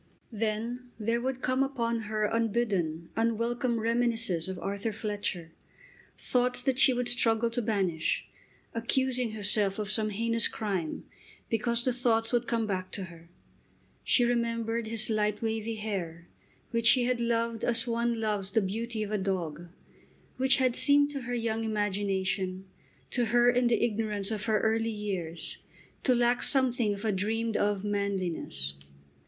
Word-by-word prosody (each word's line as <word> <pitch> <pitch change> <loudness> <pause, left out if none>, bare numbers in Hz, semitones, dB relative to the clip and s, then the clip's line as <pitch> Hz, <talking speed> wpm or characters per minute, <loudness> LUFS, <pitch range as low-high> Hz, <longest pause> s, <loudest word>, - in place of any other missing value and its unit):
Then 230 +3 -3
there 230 +2 0
would 260 0 -3
come 255 +1 +1
upon 235 -4 0
her 215 0 0
unbidden, 205 -8 0
unwelcome 230 +1 0
reminiscences 225 -6 0
of 190 - -4
Arthur 200 +4 -3
Fletcher, 205 -6 -3 0.7
thoughts 250 0 0
that 260 0 0
she 265 - +7
would 245 -1 -1
struggle 235 -1 +2
to 245 +1 -1
banish, 190 -8 0 0.5
accusing 245 0 0
herself 205 -2 0
of 210 -1 -3
some 215 0 +2
heinous 230 +2 +1
crime 190 -8 -3 0.5
because 235 +1 +1
the 255 - +2
thoughts 230 -2 +1
would 240 0 +1
come 230 -2 0
back 185 -3 -3
to 195 - -3
her. 165 0 -16 0.7
She 245 - +3
remembered 230 -1 0
his 225 0 -1
light 210 0 0
wavy 225 0 -2
hair, 180 -6 -4 0.4
which 230 -1 +1
she 250 0 +7
had 245 -1 0
loved 230 -1 0
as 230 0 +2
one 235 -1 0
loves 210 -3 -1
the 220 +2 +2
beauty 220 +3 -3
of 210 - -5
a 210 - 0
dog, 175 -4 -3 0.7
which 265 +1 +4
had 255 -2 +2
seemed 285 0 +5
to 280 -2 -4
her 245 0 -3
young 225 -1 -1
imagination, 195 -3 -1 0.5
to 245 -2 +1
her 240 +2 +4
in 245 0 +2
the 240 - +2
ignorance 210 -2 -2
of 210 -1 -2
her 215 -2 +2
early 225 +1 +1
years, 190 -7 -2 0.4
to 255 - +3
lack 240 0 +2
something 245 -6 +3
of 200 +3 -7
a 215 - +2
dreamed 220 +3 -1
of 205 -1 +1
manliness. 190 - -2
225 Hz, 155 wpm, -29 LUFS, 205-235 Hz, 0.7 s, she